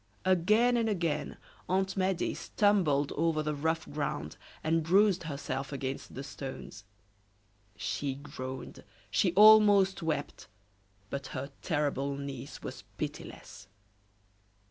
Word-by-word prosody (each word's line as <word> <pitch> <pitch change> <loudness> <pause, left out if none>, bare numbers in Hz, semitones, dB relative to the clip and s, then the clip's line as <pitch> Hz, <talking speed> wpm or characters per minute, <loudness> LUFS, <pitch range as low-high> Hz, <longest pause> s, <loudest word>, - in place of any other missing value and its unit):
Again 215 +7 +4
and 225 -1 +1
again, 165 -7 -1 0.3
Aunt 190 +1 +1
Medea 190 -2 0
stumbled 170 -9 +2
over 155 0 +1
the 150 0 -1
rough 160 +2 -1
ground, 145 0 -3 0.3
and 165 +1 +2
bruised 190 +2 +3
herself 140 -2 -4
against 135 -1 -5
the 135 - -5
stones; 130 -6 -8 0.9
she 135 +5 -2
groaned, 130 -2 -7 0.3
she 180 - +3
almost 205 -1 +7
wept, 155 -3 -3 0.6
but 140 -1 -4
her 140 +2 -5
terrible 140 -3 -1
niece 140 -1 -7
was - - -7
pitiless. 100 +1 -7
155 Hz, 110 wpm, -31 LUFS, 140-190 Hz, 0.9 s, almost